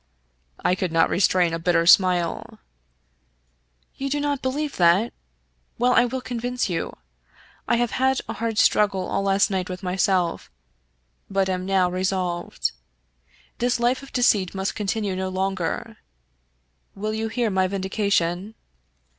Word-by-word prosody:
I - - +4
could 185 -2 -2
not 165 0 +3
restrain 180 -3 +2
a 165 - -2
bitter 170 0 +2
smile. 180 -1 +3 1.4
"You 275 0 -3
do 290 +2 -1
not 285 -2 -1
believe 285 +3 -2
that? 180 +6 +3 0.6
Well, 250 +1 +3
I 245 - +5
will 255 +2 -3
convince 245 0 -2
you. 175 -4 -3 0.7
I - - +3
have 240 -1 0
had 265 +1 +1
a - - -4
hard 230 -1 -3
struggle 195 -4 +3
all 195 - -1
last 195 +1 +2
night 185 -1 -2
with 185 +2 -6
myself, 180 -1 0 0.8
but 195 -1 +1
am 185 0 -2
now 190 -2 +3
resolved. 185 -1 -2 0.9
This 245 0 +1
life 245 +2 +1
of 275 - -13
deceit 205 -7 +2
must 190 0 -2
continue 205 -1 -2
no 190 0 -2
longer. 185 -2 -3 1.0
Will 215 +2 -3
you 220 +1 -2
hear 225 0 -1
my 190 -1 +2
vindication?" 195 0 -1
195 Hz, 140 wpm, -23 LUFS, 185-235 Hz, 1.4 s, I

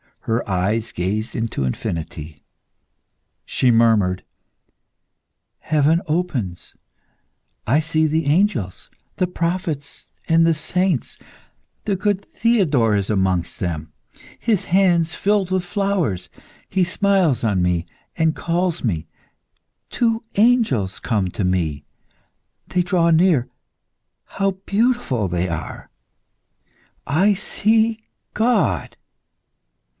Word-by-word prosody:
Her 115 +1 -1
eyes 105 +5 0
gazed 105 +6 -2
into 115 - -2
infinity. 75 +2 -5 1.0
She 130 - +1
murmured 110 -6 +3 1.4
"Heaven 155 +2 +2
opens. 145 - -3 0.9
I 135 +7 +4
see 155 0 +1
the 160 +1 0
angels, 145 - 0 0.3
the 185 - +1
prophets, 170 -5 -3 0.2
and 165 0 +4
the 165 - +4
saints.... 165 0 -1 0.7
The 205 - +1
good 200 0 0
Theodore 155 - +2
is 100 -1 -1
amongst 95 -4 0
them, 80 -4 -4 0.5
his 220 -5 0
hands 175 -3 +3
filled 200 -2 0
with 185 -1 0
flowers; 180 - -1 0.4
he 190 -1 +2
smiles 190 - +1
on 100 -5 +1
me 90 -1 0 0.3
and 160 -1 +1
calls 175 0 -1
me.... 85 -9 -1 0.8
Two 230 -1 0
angels 205 - +2
come 105 -6 -1
to 100 - -3
me. 85 -6 -1 0.8
They 180 - +1
draw 175 -1 +2
near.... 160 -7 +3 0.8
How 195 0 -1
beautiful 215 - +1
they 90 +1 -1
are! 80 -2 -6 1.2
I 185 +9 +3
see 220 +3 +1 0.3
God!" 225 -1 +1
155 Hz, 100 wpm, -21 LUFS, -, 1.4 s, I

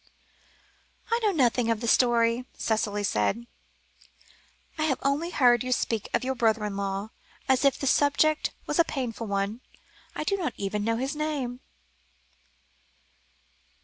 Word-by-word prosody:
"I 465 - +3
know 425 -2 +3
nothing 245 - +2
of 225 -2 +1
the 235 - -4
story," 235 0 +3
Cicely 210 -2 -1
said; 200 - 0 1.3
"I 310 - +2
have 270 -5 +1
only 285 +5 0
heard 245 -7 +4
you 255 - -4
speak 225 -4 -1
of - - 0
your 265 +1 -1
brother 225 -3 +1
in 205 -1 -4
law, 200 +2 -3 0.4
as 265 0 +3
if 275 -1 +3
the - - -4
subject 290 +3 +3 0.2
was 295 - -1
a - - +8
painful 245 -8 -4
one. 200 +3 -2 0.5
I - - -2
do 395 +6 0
not 345 -5 -3
even 205 +1 -2
know 225 +1 0
his 270 +4 -2
name." 290 -5 -3
245 Hz, 145 wpm, -27 LUFS, 220-280 Hz, 1.3 s, a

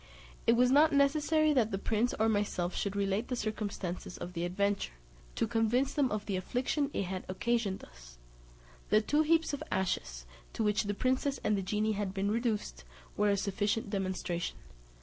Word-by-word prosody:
It 230 - +7
was 250 +1 +4
not 305 +3 +6
necessary 300 +2 +3
that 240 -6 +3
the 195 - -2
prince 220 +4 0
or 220 - +4
myself 205 -4 0
should 200 0 -2
relate 200 +3 0
the 250 - -2
circumstances 205 -6 -4
of 180 - -7
the 170 0 -2
adventure, 200 - -1 0.4
to - - +1
convince 235 +4 +1
them 285 -4 +2
of 210 -2 -3
the 200 - -2
affliction 255 - -1
it - - -1
had 185 0 -4
occasioned 210 0 -1
us. - - -14 0.7
The 215 - +5
two 295 +7 +2
heaps 325 0 +2
of 285 - -3
ashes, - - -2 0.3
to 225 - -1
which 210 0 +2
the 205 0 -2
princess 260 +4 0
and 210 - +2
the 195 - -1
genie 210 +3 0
had 205 -2 -2
been 200 +1 0
reduced, 215 - -1 0.3
were 210 0 +2
a 200 - +2
sufficient 205 +3 -1
demonstration. 185 -3 -2
210 Hz, 180 wpm, -32 LUFS, 195-250 Hz, 0.7 s, It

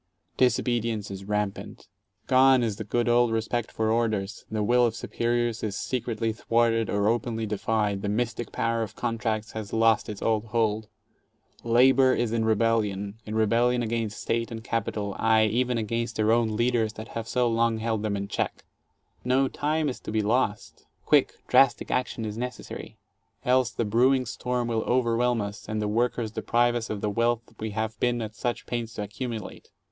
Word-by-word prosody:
Disobedience 115 -4 +1
is 95 0 -7
rampant. 105 -1 -3 0.4
11 130 0 +5
^one - - +1
is 105 -3 -2
the - - -4
good 120 +3 0
old 120 0 +4
respect 115 +1 -1
for 110 0 0
orders, 110 -3 -1
the 110 -1 -1
will 125 +4 +4
of 115 - -4
superiors 120 -1 -1
is 105 -2 -3
secretly 115 -3 -2
thwarted 115 0 +1
or 100 0 +1
openly 115 0 0
defied, 105 -1 -1
the 100 - -2
mystic 115 +1 -2
power 115 0 0
of 110 -3 -5
contracts 110 -2 -2
has 110 -3 -6
lost 115 -1 +3
its 105 -2 -6
old 110 -1 +1
hold. 110 -1 0 0.8
Labor 130 +2 +5
is 120 -2 0
in 115 -1 0
rebellion 105 -3 +1
— - - -39
in 105 - -4
rebellion 120 +3 +2
against 115 -2 -2
State 115 0 -1
and 115 -2 -7
Capital, 105 -3 -2
aye, 110 0 +4
even 120 +3 +1
against 115 +1 -2
their 110 0 +2
own 115 -2 +2
leaders 115 -1 +1
that 110 0 -9
have 115 -1 -5
so 125 0 +1
long 115 0 +1
held 110 -1 -1
them 105 -2 -1
in 100 0 -4
check. - - -3 0.6
No 130 +2 +2
time 155 +3 -1
is 130 - -3
to - - -7
be 110 -1 +1
lost! 110 -1 -1 0.2
Quick, - - +3
drastic 135 -4 +4
action 125 -2 -1
is 105 +1 -5
necessary. 125 -2 -6 0.5
Else 125 -1 +3
the 115 - -2
brewing 125 +5 +3
storm 125 0 -2
will 115 -1 0
overwhelm 120 -1 +2
us, 100 +1 -7
and 110 0 -1
the 105 - -1
workers 115 0 0
deprive 120 +2 +1
us 120 -2 -3
of 105 -2 -4
the 105 - 0
wealth 115 +2 +1 0.2
we 110 - -3
have 110 +1 -3
been 120 -1 +1
at 110 0 -6
such 120 +2 -3
pains 115 -1 -4
to 105 - -3
accumulate. 110 +1 -6
115 Hz, 185 wpm, -26 LUFS, 110-120 Hz, 0.8 s, 11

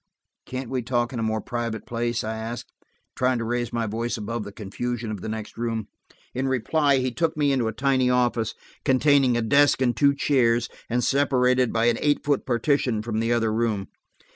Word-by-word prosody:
"Can't 130 -1 -5
we 130 -1 0
talk 120 0 -1
in 120 - -3
a 110 -1 0
more 110 0 -1
private 115 -3 -4
place?" 120 0 -2
I 110 +1 -3
asked, 115 +2 -6 0.4
trying 125 0 +1
to 115 - -2
raise 120 +1 -2
my 115 -1 -1
voice 115 +3 -2
above 110 +1 -4
the 105 - -8
confusion 115 +3 -4
of 105 -4 -5
the 110 - -5
next 110 0 -6
room. 115 -2 -2 0.4
In 130 +2 -1
reply 140 +3 +2
he 130 -1 0
took 160 +4 -1
me 145 -2 +2
into 130 -4 +1
a - - 0
tiny 130 +2 +1
office, 120 -3 +1 0.3
containing 135 -2 +4
a 120 - 0
desk 140 +6 +4
and 125 -2 +1
two 140 -1 +4
chairs, 120 -5 +2 0.2
and 120 +1 0
separated 130 -3 +2
by 115 0 +1
an 120 -1 +2
eight 145 -1 +2
foot 145 -2 0
partition 125 -2 +1
from 110 -1 -2
the 115 +1 0
other 115 -2 +1
room. 110 -4 -1
120 Hz, 200 wpm, -24 LUFS, 115-130 Hz, 0.4 s, containing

